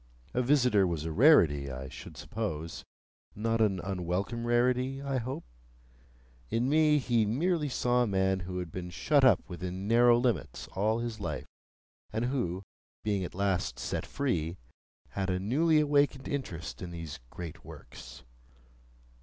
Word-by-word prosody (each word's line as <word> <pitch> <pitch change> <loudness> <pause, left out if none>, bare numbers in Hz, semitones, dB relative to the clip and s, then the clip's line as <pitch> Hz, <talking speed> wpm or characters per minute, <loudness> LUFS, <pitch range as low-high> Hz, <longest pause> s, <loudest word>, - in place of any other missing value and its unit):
A 125 - +2
visitor 125 -7 +4
was 80 -3 -3
a 80 - -2
rarity, 80 - +5
I 65 +1 -6
should - - -10
suppose; 85 -7 -4 0.5
not 115 +2 0
an 100 -4 +2
unwelcome 95 +5 -2
rarity, 125 +2 +2
I 135 -1 -1
hoped? 130 - -5 1.0
In 120 +2 +1
me, 150 +1 +4
he 120 -5 +2
merely 150 - 0
saw 125 -1 +1
a 120 - +2
man 95 -1 +1
who 90 0 -5
had 90 -3 -4
been 90 0 -5
shut 140 - +2
up 125 -8 +5
within 90 +2 -5
narrow 120 +1 +6
limits 120 -1 -1
all 105 +4 0
his 115 -2 -4
life, - - -4 0.7
and 110 +2 -1
who, 100 -8 -2 0.4
being 100 -3 0
at 90 - -6
last 95 -10 0
set - - -3
free, 90 - -1 0.5
had 95 -1 -2
a 90 0 0
newly 155 - +3
awakened 145 -2 +2
interest 90 -12 -4
in 90 - -5
these 85 -4 -7
great 85 +1 -8
works. - - -11
110 Hz, 150 wpm, -30 LUFS, 90-125 Hz, 1.0 s, narrow